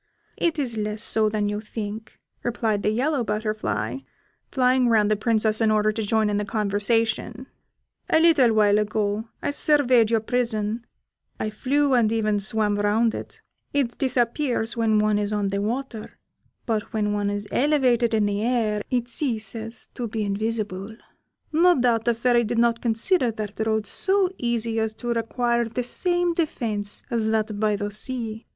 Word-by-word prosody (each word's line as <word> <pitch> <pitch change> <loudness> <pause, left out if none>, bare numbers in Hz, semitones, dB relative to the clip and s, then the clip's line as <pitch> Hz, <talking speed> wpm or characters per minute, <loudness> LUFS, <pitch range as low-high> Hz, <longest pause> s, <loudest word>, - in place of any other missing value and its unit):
"It 335 -1 0
is 250 -6 -2
less 210 +1 -2
so 215 -1 +1
than 210 -1 -1
you 205 0 -2
think," 215 0 -7 0.2
replied 225 -3 -1
the - - +1
yellow 260 +4 0
butterfly, 210 - -2 0.5
flying 255 -1 +3
round 215 -2 +3
the - - +4
Princess 220 0 +1
in 220 - +4
order 215 0 +3
to 220 +1 -4
join 220 +1 +1
in 205 -1 0
the 210 - 0
conversation: 220 +3 -1 0.6
"a 320 - +4
little 320 -8 +5
while 210 -1 +4
ago, 210 0 -1 0.2
I - - 0
surveyed 260 -6 +3
your 230 -1 +3
prison, 230 -1 -2 0.5
I 215 - -2
flew 280 +5 +1
and 230 -4 +3
even 215 -2 +1
swam 210 0 0
round 220 +3 +2
it; - - -8 0.3
it 270 -4 -1
disappears 245 -2 0
when 225 -2 +2
one 210 0 +2
is 205 0 -2
on 205 -2 0
the 200 +1 -1
water, 230 +1 -4 0.5
but 220 -3 -2
when 210 -1 0
one 205 -1 0
is 205 0 -4
elevated 250 -5 +2
in 215 -1 +2
the 205 0 -1
air 225 -3 0
it 245 -2 0
ceases 225 -3 -4
to 240 - -4
be 220 0 -3
invisible. 210 0 -3 0.5
No 340 0 +4
doubt 235 -2 +2
the 235 - +2
Fairy 240 0 +2
did 235 +1 -2
not 235 0 +2
consider 240 - +2
that 215 0 -4
road 220 -1 0
so 385 - +1
easy 230 -2 -1
as 220 0 -1
to 240 +2 -6
require 235 +1 0
the 230 +2 -3
same 350 +6 0
defence 225 -11 -2
as 230 -2 0
that 220 -1 -1
by 215 -1 +2
the 205 0 -3
sea. 225 0 -5
225 Hz, 170 wpm, -24 LUFS, 210-240 Hz, 0.6 s, little